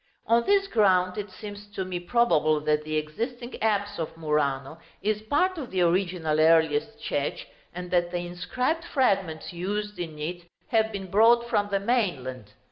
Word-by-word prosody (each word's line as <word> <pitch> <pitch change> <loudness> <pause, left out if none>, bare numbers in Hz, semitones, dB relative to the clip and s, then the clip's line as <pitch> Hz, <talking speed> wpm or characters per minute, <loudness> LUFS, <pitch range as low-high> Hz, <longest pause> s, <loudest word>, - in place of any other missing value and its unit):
On 235 +1 +3
this 400 -1 +4
ground 185 - +3
it 205 0 -5
seems 205 +2 -9
to 190 - -2
me 180 -1 -3
probable 175 -7 +2
that 150 0 +1
the 155 0 -2
existing 235 - -4
apse 205 -2 0
of 165 0 -4
Murano 150 -1 -1 0.2
is 210 0 0
part 325 +11 +1
of 265 - -6
the 185 -1 0
original 170 -3 +1
earliest 160 +6 +3
church, 145 -10 -2 0.3
and 180 0 -7
that 175 -1 +2
the 175 - -3
inscribed 250 - -2
fragments 195 - 0
used 205 +3 -3
in 160 -3 -5
it 170 +3 -5 0.2
have 220 -1 +2
been 195 -3 -6
brought 235 +3 +5
from 205 -3 +1
the 200 -1 +1
mainland. 140 - -1
185 Hz, 165 wpm, -26 LUFS, 160-220 Hz, 0.3 s, brought